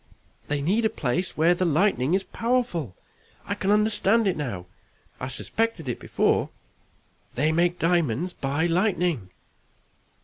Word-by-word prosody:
They 145 -1 -1
need 205 +9 +1
a 220 - +3
place 170 +5 -2
where 165 +3 +5
the 180 - -1
lightning 165 -2 +2
is 190 - 0
powerful. 230 - -1 0.5
I - - -2
can 190 - -2
understand 210 +1 +3
it 190 - +1
now 115 -12 -4 0.5
I 130 - -4
suspected 185 - -2
it 120 - -3
before. - - +1 0.9
They 150 +5 +2
make 175 +2 +2
diamonds 170 -1 +1
by 140 +4 -1
lightning!" 175 - 0
175 Hz, 135 wpm, -25 LUFS, 145-195 Hz, 0.9 s, where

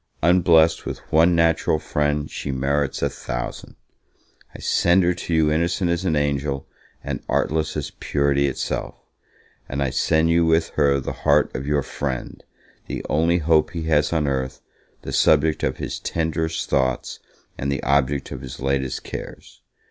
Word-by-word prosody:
Unblest 85 -2 +4
with - - -3 0.2
one 85 +3 +5
natural 80 -1 +2
friend, 75 -1 -1
she - - -4
merits 70 +1 -1
a - - +2
thousand. - - -6 0.8
I - - -6
send 90 +2 +3
her 90 +1 +3
to 85 - -7
you 80 -1 +3
innocent 85 +3 +1
as 85 +2 -1
an 80 -4 +1
angel, 70 -1 -1 0.4
and - - -4
artless 80 0 0
as - - -4
purity 70 -1 0
itself; 70 - -3 0.7
and 70 +1 -1
I 65 - -1
send 80 +4 +2
you 85 0 +4
with 80 0 +2
her 70 -2 +2
the 65 - -4
heart - - +3
of 65 +1 -4
your 75 -2 +1
friend, 65 -3 -5 0.4
the - - -5
only 85 +3 +3
hope 80 -1 +2
he 85 -2 -4
has 75 0 +3
on 80 -3 +1
earth, 65 -1 -2 0.4
the - - -6
subject 80 0 +3
of - - -1
his - - -4
tenderest 80 0 -2
thoughts, 65 -2 -1 0.4
and 70 +1 -3
the 70 - -2
object 70 0 +1
of 65 - -6
his 65 -2 -8
latest 65 -1 -1
cares. - - -9
75 Hz, 165 wpm, -22 LUFS, 70-80 Hz, 0.8 s, one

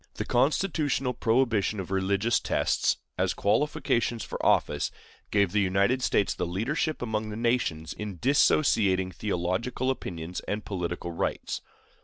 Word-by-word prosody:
The - - -3
constitutional 135 -1 +1
prohibition 115 -3 +1
of 95 -1 -6
religious 100 +4 +1
tests - - +1 0.2
as - - +1
qualifications 115 -1 +1
for - - -6
office - - +2 0.4
gave 100 -3 +2
the 105 - +2
United 100 +7 +2
States 100 -5 +2
the - - -3
leadership 125 - -1
among 110 -2 -2
the 105 - -5
nations 115 -9 0
in 105 -3 -6
dissociating 105 - +3
theological 100 +7 -1
opinions 85 -8 -5
and 105 +1 -3
political 90 -2 -3
rights. 85 - -2
105 Hz, 130 wpm, -27 LUFS, 95-125 Hz, 0.4 s, dissociating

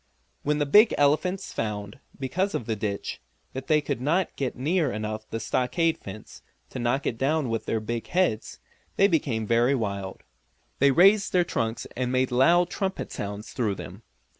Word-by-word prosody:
When 150 +1 0
the 145 - +1
big 210 +10 +6
elephants 180 +7 +1
found, 105 0 -4 0.2
because 185 +9 -1
of 115 - -3
the 110 - -1
ditch, 100 -1 -4 0.3
that 130 0 -6
they 155 -2 +4
could 140 -4 -3
not 165 +7 0
get 135 -3 -2
near 150 +2 +1
enough 110 0 -5
the 115 - -3
stockade 130 +9 0
fence 100 +2 -10 0.3
to - - -5
knock 125 +3 0
it 115 - -2
down 145 0 +1
with 115 -1 -3
their 110 - 0
big 115 +2 -4
heads, 175 -12 0 0.4
they 195 - +5
became 135 - 0
very 120 +5 +3
wild. 100 -5 -4 0.6
They 140 - +5
raised 195 +8 +5
their 180 -1 +4
trunks 115 -6 -2
and 125 0 -1
made 130 0 +1
loud 170 +8 +4
trumpet 195 -1 -3
sounds 105 +1 -6
through 110 -6 0
them. 95 +2 -9
130 Hz, 175 wpm, -26 LUFS, 110-160 Hz, 0.6 s, big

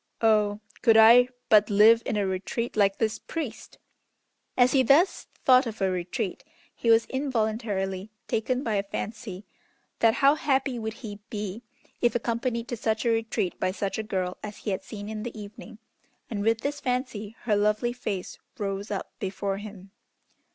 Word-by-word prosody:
"Oh, 210 -2 +3 0.2
could 225 -2 +5
I 235 +3 +8 0.2
but 210 0 +5
live 215 +3 +6
in 210 - -1
a 205 - +1
retreat 195 +5 -3
like 200 -2 +3
this 220 -1 -1
priest!" 270 -10 -6 0.8
As 250 0 +5
he 270 - +4
thus 290 +9 +3 0.2
thought 255 -1 +6
of 220 -1 -6
a 190 -1 +1
retreat, 185 +5 -3 0.3
he 230 - -2
was 225 0 +6
involuntarily 215 -7 -2 0.2
taken 250 +4 -1
by 220 -5 0
a - - +2
fancy, 210 -3 -5 0.5
that 225 -1 +4
how 280 +1 +5
happy 270 -4 0
would 220 0 -4
he 205 -1 -7
be 210 -1 -5 0.4
if 240 -1 +2
accompanied 235 0 -1
to 240 - -2
such 220 +1 -1
a - - +3
retreat 225 -5 -1
by 185 - +1
such 195 +2 -3
a - - +1
girl 185 -4 -3
as 210 -1 -7
he 210 - -4
had 190 - -2
seen 205 +1 -8
in 215 0 -5
the 230 -1 -6
evening, 210 +2 -10 0.5
and 205 -3 -2
with 225 +2 +1
this 290 +1 -2
fancy 250 -5 -3
her 220 -3 +1
lovely 210 +4 +1
face 210 -7 -5 0.2
rose 200 0 -3
up 200 -2 -4
before 195 0 -2
him. 200 -2 -10
220 Hz, 170 wpm, -27 LUFS, 205-240 Hz, 0.8 s, I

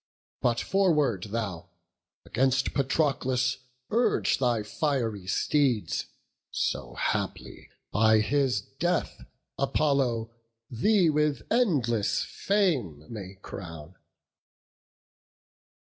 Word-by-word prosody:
But, 120 -2 +2
forward 150 - +2
thou! 100 -5 -4 0.6
against 135 +2 +1
Patroclus 130 -3 +1 0.3
urge 235 +2 +2
Thy 120 -4 +1
fiery 115 - -2
steeds, 130 +1 +1 0.4
so - - -2
haply - - -3 0.2
by 110 +1 +5
his 130 -3 +1 0.2
death 175 +2 -1 0.4
Apollo 135 -5 +1 0.4
thee 175 - +3
with 150 -1 +1
endless 120 - +2
fame 140 - 0
may 95 -3 -7
crown." 80 -3 -8
125 Hz, 80 wpm, -28 LUFS, 105-150 Hz, 0.6 s, by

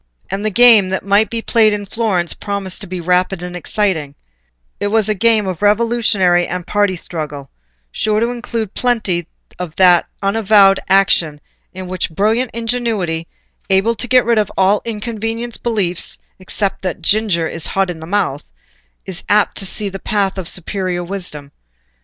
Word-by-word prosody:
And 195 +1 -3
the 215 - +1
game 215 -2 +6
that 190 0 -3
might 200 +2 +3
be 230 -1 -4
played 220 -2 +3
in 205 -1 -3
Florence 195 -5 -1
promised 200 -3 -4
to 200 - -7
be 180 0 -5
rapid 180 +1 0
and 180 0 -6
exciting; 175 -6 -1 0.6
it - - 0
was 215 0 +1
a 215 - +1
game 220 0 +2
of 185 -4 -4
revolutionary 205 -5 +2
and 180 -2 -4
party 205 -2 +1
struggle, 150 -5 -5 0.4
sure 215 - 0
to 235 +2 0
include 230 -4 -4
plenty 210 -9 0 0.3
of 175 -3 -6
that 180 -2 +5 0.2
unavowed 200 -1 +4
action 175 -6 +3 0.3
in 185 0 -8
which 185 0 -2
brilliant 220 +9 +1
ingenuity, 225 -8 -2 0.4
able 195 +4 +3
to 245 - -6
get 255 0 +4
rid 235 -1 +3
of 210 - -1
all 195 +2 +3
inconvenient 225 +1 -4
beliefs 200 -7 -1 0.2
except 195 +1 -3
that 185 -3 -4
"ginger 200 -6 +1
is 165 0 -1
hot 195 -2 0
in 165 - -8
the 160 - -9
mouth," 185 -7 0 0.6
is 190 -1 -5
apt 210 0 +3
to 195 - 0
see 210 +2 -2
the 195 0 -6
path 195 -2 -1
of 175 - -2
superior 185 -1 -2
wisdom. 175 -6 -6
195 Hz, 165 wpm, -17 LUFS, 180-220 Hz, 0.6 s, game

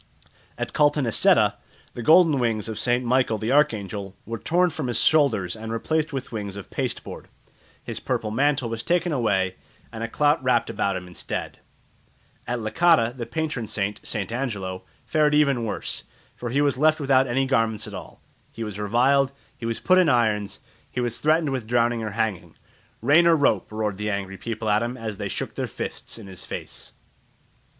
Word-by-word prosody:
At - - -4
Caltanisetta 145 -5 +3 0.4
the 120 - -6
golden 160 +1 +6
wings 115 -4 0
of 110 -1 -5
St. 125 +1 +1
Michael 125 -2 +2
the 110 +3 -2
Archangel 100 -8 +1
were 115 +1 -5
torn 175 - +2
from 155 -4 -3
his 120 - +1
shoulders 115 - +3
and 110 0 -6
replaced 155 +7 -1
with 135 -3 -5
wings 100 -3 -4
of 100 - -9
pasteboard; - - -4 0.6
his - - -5
purple 110 - -2
mantle 135 +2 +1
was 115 -1 -3
taken 175 +4 +1
away 95 -8 0 0.3
and 115 0 -6
a - - -1
clout 145 +4 +2
wrapt 125 -2 +2
about 100 -1 0
him 90 -1 -5
instead. 90 - -6 0.9
At 120 0 -1
Licata 125 0 +3
the 120 -3 -5
patron 155 -8 -3
saint, 105 0 -2
St. 100 -3 -3
Angelo, 100 -7 -3 0.2
fared 150 -1 +2
even 140 -6 +3
worse, 105 - -4 0.3
for 120 - -5
he 140 +5 +1
was 140 -3 +1
left 155 +1 +4
without 135 -2 +3
any 130 +2 +1
garments 115 -5 +1
at - - -8
all; - - -10 0.3
he 115 - -6
was 105 -2 -6
reviled, 130 +6 +3 0.2
he 115 - -5
was 115 - -2
put 185 0 +4
in 180 -4 +4
irons, 110 -5 +1 0.3
he - - -4
was 120 -1 -1
threatened 155 -1 +2
with 130 -5 -3
drowning 120 0 +2
or 110 - -3
hanging. 110 -5 -2 0.5
"Rain 170 +4 +6
or 170 - +6
the - - +5
rope!" 140 - +1
roared 105 -2 -2
the 105 +1 -2
angry 95 -1 -3
people 115 0 -4
at 105 +1 +3
him, 120 +2 -3
as 110 -4 -5
they - - -3
shook - - -4
their - - -3
fists - - -6
in 110 - -10
his 95 -3 -9
face. - - -7
120 Hz, 185 wpm, -24 LUFS, 110-140 Hz, 0.9 s, golden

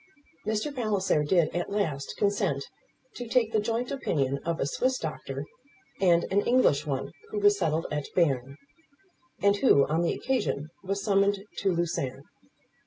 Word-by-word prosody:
Mr. 220 +7 -1
Palliser 200 - +1
did 165 +1 +2
at 175 - -1
last 160 -9 -2
consent 200 -9 0 0.5
to 245 - -6
take 230 -1 +2
the 220 - +2
joint 230 +3 -2
opinion 140 - -1
of 165 +2 -3
a - - +1
Swiss 255 - 0
doctor 145 -3 -5 0.5
and 175 -3 +4
an 200 +1 +3
English 180 - +3
one 135 -1 -2 0.2
who - - -5
was 205 0 +4
settled 160 -2 0
at 150 -1 -2
Berne; 140 -5 +1 0.9
and 200 0 +4
who, 145 - +5
on 160 +3 0
the 170 - +1
occasion, 210 - -1
was 195 +1 -2
summoned 200 -1 +2
to 195 - +1
Lucerne. 140 -6 -2
185 Hz, 155 wpm, -28 LUFS, 145-210 Hz, 0.9 s, who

